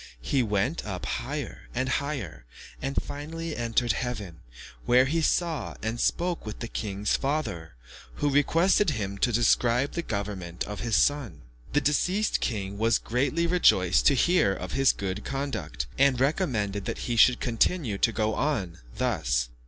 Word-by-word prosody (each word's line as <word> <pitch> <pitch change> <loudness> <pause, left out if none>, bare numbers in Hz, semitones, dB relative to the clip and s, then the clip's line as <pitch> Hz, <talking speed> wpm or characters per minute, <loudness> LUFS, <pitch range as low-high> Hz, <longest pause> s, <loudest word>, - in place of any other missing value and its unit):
He 135 - +1
went 110 - 0
up 95 -4 -5
higher - - -5
and 130 - 0
higher, 130 - -3 0.4
and 135 +1 -3
finally 155 +3 -6
entered 120 0 +1
heaven, 105 -6 -4 0.5
where 125 +2 +5
he 160 +5 0
saw 160 -5 0
and 110 +2 -2
spoke 175 +5 0
with 105 -1 -6
the 120 - -5
king's 105 -2 -2
father, 110 - -3 0.4
who 145 - 0
requested 165 +7 +3
him 100 -7 -3
to 120 - +2
describe 120 +3 +2
the 170 - -2
government 100 - -4
of 105 0 -6
his 115 -2 0
son. 120 - +1 0.3
The 145 - +3
deceased 180 +9 +1
king 100 -3 -3
was 115 +1 +3
greatly 140 +8 0
rejoiced 95 - +4
to 140 - +5
hear 175 - +3
of - - -6
his 135 0 +4
good 100 +1 -4
conduct, 135 - -3
and 135 -2 +4
recommended 120 - 0
that - - -3
he 120 - -1
should 120 +2 +5
continue 120 - 0
to 115 - +3
go 110 -1 0
on 100 - -1 0.2
thus. - - 0
120 Hz, 155 wpm, -27 LUFS, 100-145 Hz, 0.5 s, where